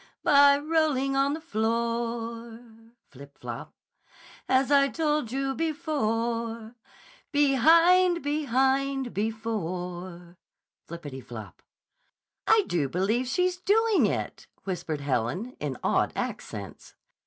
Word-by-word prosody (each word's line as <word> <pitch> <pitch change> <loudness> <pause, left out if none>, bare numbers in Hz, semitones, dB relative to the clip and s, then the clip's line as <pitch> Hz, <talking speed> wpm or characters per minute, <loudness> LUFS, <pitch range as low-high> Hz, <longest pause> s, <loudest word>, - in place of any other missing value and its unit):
By 280 0 +6
rolling 295 -3 +1
on 275 +1 +2
the - - -6
floor, 230 -1 -2 0.5
(Flip! 140 +1 -14
Flop!) - - -8 0.7
As 265 +2 +2
I 280 -1 +5
told 300 -5 -1
you 270 +1 -1
before, 235 -7 -2 0.6
Behind! 330 +5 +4
Behind! 270 -2 0
Before!" 180 -5 -4 0.5
(Floppity 145 -6 -8
flop!) 110 -3 -10 0.9
"I 445 -2 +5
do 150 -6 -1
believe 210 - 0
she's 360 +5 0
doing 430 +3 +3
it," - - -4 0.2
whispered 165 -6 -4
Helen 140 - -2
in 140 -4 -4
awed - - +1
accents. - - -6
240 Hz, 95 wpm, -27 LUFS, 195-290 Hz, 0.9 s, By